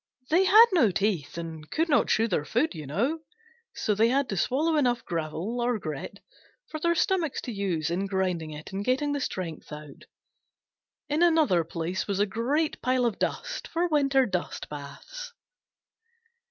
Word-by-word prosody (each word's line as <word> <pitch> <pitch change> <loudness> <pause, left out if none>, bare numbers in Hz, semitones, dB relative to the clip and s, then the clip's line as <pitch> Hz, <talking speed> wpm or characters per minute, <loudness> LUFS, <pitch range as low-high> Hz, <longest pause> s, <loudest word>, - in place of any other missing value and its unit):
They 360 +4 +5
had 430 +5 +9
no 320 - +4
teeth 185 -6 -1
and 160 -2 -7
could 325 +2 0
not 290 - +3
chew 225 +1 +2
their 175 -8 0
food, 240 - 0
you 155 -4 -7
know, 240 - 0 0.6
so 210 - 0
they 220 +3 +4
had 270 +2 +1
to 195 - -2
swallow 300 - +1
enough 245 -5 +1
gravel, 170 +8 -3
or 240 -1 +1
grit, 155 +1 -6 0.5
for 310 - -4
their 340 +2 +2
stomachs 350 -5 +1
to 245 - -5
use 180 -6 -1
in 190 +3 -1
grinding 185 -4 -1
it 150 0 -9
and 195 +1 -3
getting 265 +5 +1
the 285 - -1
strength 175 - -5
out. 150 -2 -10 1.0
In 300 +2 0
another 315 - +4
place 165 +3 -3
was 200 -1 -1
a 205 - +4
great 255 +10 -1
pile 255 -1 +2
of 230 -4 -1
dust - - -3
for 340 +2 0
winter 275 -3 +3
dust 185 -6 -4
baths. 480 - -8
225 Hz, 170 wpm, -27 LUFS, -, 1.0 s, had